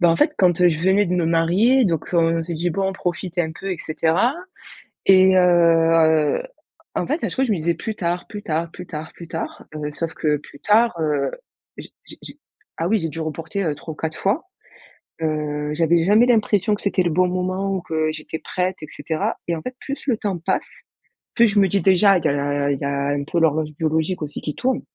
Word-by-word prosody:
Bah, 175 - +5
en 165 - +3
fait, - - +3
quand, 180 -2 +3
heu, 180 - +6
je 155 -2 -1
venais 190 +3 +3
de 180 - -1
me 175 -2 +1
marier, 180 +11 +3
donc, 165 -5 -2
heu, - - +4
on 165 0 +2
s'est 170 +1 -5
dit: 175 +2 -1
«Bon 195 +4 -2
on 195 - -2
profite, 180 0 -4
un 160 -2 0
peu 195 +4 -5
et 175 - -6
cetera» 165 - +1 0.7
et 190 0 +6
heu, 165 - +4 0.5
en - - -1
fait, 310 - -2
à - - 0
chaque - - -5
fois, 265 - +1
je 235 - -1
me 200 - +1
disais: 170 +1 0
«Plus 220 +6 -5
tard, 175 -2 -2
plus 205 -1 -8
tard, 165 -3 -2
plus 180 +1 -9
tard, 155 0 -7
plus 170 - -11
tard», 165 0 -6
heu, 150 -1 -4
sauf 165 +2 -4
que 150 -1 0
plus 140 0 -15
tard, 225 +6 +3
heu, 150 -3 0 0.5
j - - -9 0.2
j - - -12
j - - -11 0.4
Ah 165 - -1
oui 215 +2 +2
j'ai 165 - -3
dû 160 +2 -7
reporter, 165 +5 -4
heu, 155 - 0
3 160 +2 -8
ou - - -17
4 160 -1 -4
fois. 215 - 0 0.8
Heu, 150 -1 -2
j’avais 165 +1 +2
jamais 210 +6 +5
l'impression 210 -4 +2
que 205 - -6
c'était 195 -2 +1
le 175 - 0
bon 180 +3 +2
moment 185 +2 -2
ou 185 - -3
que 160 -2 -1
j'étais 155 +1 -6
prête 185 +1 -2
et - - -5
cetera 155 +1 -3
et 170 - 0
en - - -6
fait, 250 - -6
plus 280 0 -6
le 245 -5 +2
temps 200 -5 -3
passe, 165 - -3 0.5
plus 235 - +5
je 205 -1 +2
me 195 - +5
dis 200 +1 +1
déjà 190 +2 +5
il 170 - -5
y - - +5
a 140 - +1
la 145 0 0
il 140 - -2
y - - -6
a 140 0 -1
un 145 0 -1
peu 170 +4 -1
l'horloge 155 -1 +1
biologique 160 +2 -1
aussi 150 0 -6
qui 150 - -4
tourne. 260 0 0
170 Hz, 240 wpm, -21 LUFS, 155-190 Hz, 0.8 s, heu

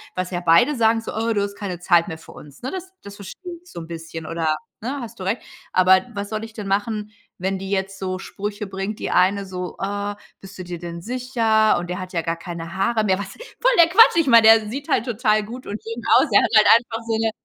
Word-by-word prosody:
was 185 0 -3
ja 175 -1 -2
beide 175 - +4
sagen, 225 -1 +3
so: - - -7
„Oh, 225 +1 0
du 205 - 0
hast 200 0 -3
keine 195 -4 -5
Zeit 175 -1 +3
mehr 160 - -6
für 160 - -15
uns“, 145 -2 -14
ne, 260 +2 -4
das 375 0 -7
das 200 0 -11
verstehe 350 - -9
ich 355 - -19
so - - -7
'n 165 - -9
bisschen 165 -1 -7
oder, 160 -1 -1 0.2
ne, 260 +6 -4
hast 235 -5 -9
du - - -5
recht, 195 +6 -1 0.3
aber 185 0 +4
was 200 0 -4
soll 215 0 -4
ich 225 0 -9
denn 210 -3 -7
machen, 210 +2 -2 0.3
wenn 190 +2 -1
die 195 +1 -6
jetzt 195 0 -2
so 185 -1 -3
Sprüche 205 +1 -5
bringt 195 +2 -5
die - - -3
eine 195 +2 +2
so: 180 -1 -6
„Ah, 205 +1 -3 0.2
bist 195 +1 -12
du - - -5
dir 175 -1 -6
denn 170 0 -7
sicher” 230 -1 +1
und 175 0 -6
„Der 180 +1 -3
hat 185 0 -8
ja 170 - 0
gar 165 0 -3
keine 170 0 -7
Haare 220 +3 +1
mehr.” 190 -3 +2
Was 200 -1 -6
voll - - -1
der 335 - +8
Quatsch, 390 0 +6
ich 330 -3 +3
meine, 230 -3 +7
der 220 -1 +6
sieht 280 +5 -6
halt 230 - +1
total 215 -3 +1
gut 240 +5 -9
und 205 +1 -5
schön 230 +1 -6
aus, - - +3
ja. - - +7
Er - - +1
hat - - +3
halt - - +6
einfach 230 -1 -6
so 225 - 0
'ne 225 0 0
200 Hz, 260 wpm, -22 LUFS, 185-225 Hz, 0.3 s, der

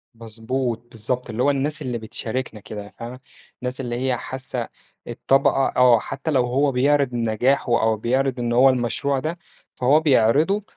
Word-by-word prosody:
مضبوط، 115 +2 -4
بالضبط، 125 +3 -3
اللي 115 +2 -1
هو - - +4
الناس 145 +2 -1
اللي 125 -4 -3
بتشارِكنا 115 +1 -5
كده 105 +1 -8
يعني، 100 0 -12
فاهمة؟ 120 +4 -8 0.4
الناس 125 +1 -4
اللي 120 -2 -3
هي 130 -1 0
حاسَّة 130 -1 -5 0.4
الطبقة 135 0 +1
آه، 125 -2 +6
حتى 140 +7 -4
لو 130 -4 +2
هو 135 +4 +1
بيعرض 140 0 +2
نجاحه 120 +2 +1
أو 110 0 +2
بيعرض 130 +3 0
إن 120 -1 -1
هو 130 +3 +6
المشروع 130 +2 0
ده، 160 +5 -4 0.4
فهو 135 +5 +4
بيعرضه 155 - +3
125 Hz, 160 wpm, -22 LUFS, 115-135 Hz, 0.4 s, آه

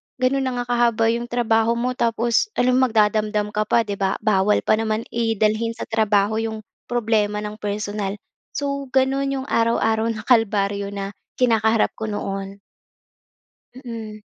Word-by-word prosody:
gano'n 260 +1 +1
na 255 - -1
nga - - -14
kahaba 230 -2 +3
'yong 235 +1 -2
trabaho 230 -1 +1
mo 245 +2 -1
tapos 235 - +1
alangan 255 +1 +3
magdadamdam 215 -1 +1
ka 215 0 -1
pa, 235 - +3
'di 200 -2 -5
ba? 195 -1 +1
Bawal 210 -1 +2
pa 215 - +2
naman 220 0 -1
i 230 -1 0
dalhin 220 +2 +1
sa 230 - -5
trabaho 220 -1 +1
'yong 220 -1 -4 0.2
problema 215 -3 0
ng 210 +1 -6
personal. 205 -1 -3 0.4
So, 280 -1 -2
gano'n 275 +1 +2
'yong - - -11
araw-araw 225 -1 +2
na 220 -1 -3
kalbaryo 205 -4 +2
na 200 0 -5 0.2
kinakaharap 225 -3 +2
ko 220 - -3
noon. 195 -1 -4 1.1
Mm. 225 -4 -8
220 Hz, 150 wpm, -22 LUFS, 210-235 Hz, 1.1 s, kahaba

